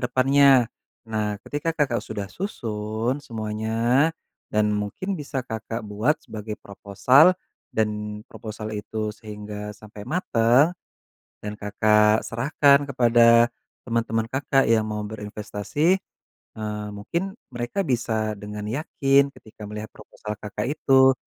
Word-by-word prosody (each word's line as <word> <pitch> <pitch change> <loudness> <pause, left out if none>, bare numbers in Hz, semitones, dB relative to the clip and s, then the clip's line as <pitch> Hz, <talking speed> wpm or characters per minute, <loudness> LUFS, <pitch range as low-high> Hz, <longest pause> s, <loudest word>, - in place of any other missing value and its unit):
depannya. 135 -1 +5 0.3
Nah 105 -2 -2
ketika 160 +3 -3
Kakak 135 -6 +1
sudah 100 -1 -6
susun 115 - -3
semuanya 115 +3 0 0.5
dan 105 0 +3
mungkin 105 - -2
bisa 140 -3 -3
Kakak 115 0 -5
buat 105 +7 +1
sebagai 105 0 -6
proposal 105 - +4 0.4
dan 105 -1 -2
proposal 110 -1 -7
itu 110 0 -3
sehingga 105 -1 -8
sampai 105 -1 -12
mateng, 135 -3 +3 0.7
dan 105 0 -6
Kakak 105 +1 +3
serahkan 140 +4 +3
kepada 120 -2 +5 0.3
teman-teman 115 -1 -1
Kakak 135 0 +2
yang 110 -1 +3
mau 105 0 -3
berinvestasi, 105 - -1 0.6
eee, 105 -1 -4
mungkin 170 - -3 0.2
mereka 120 +11 -3
bisa 115 - 0
dengan 105 +1 -7
yakin 140 +1 +2
ketika 110 -4 -12
melihat 105 +1 -6
proposal 105 0 -9
Kakak 105 +4 -4
itu, 135 -3 +4
110 Hz, 115 wpm, -24 LUFS, 105-135 Hz, 0.7 s, depannya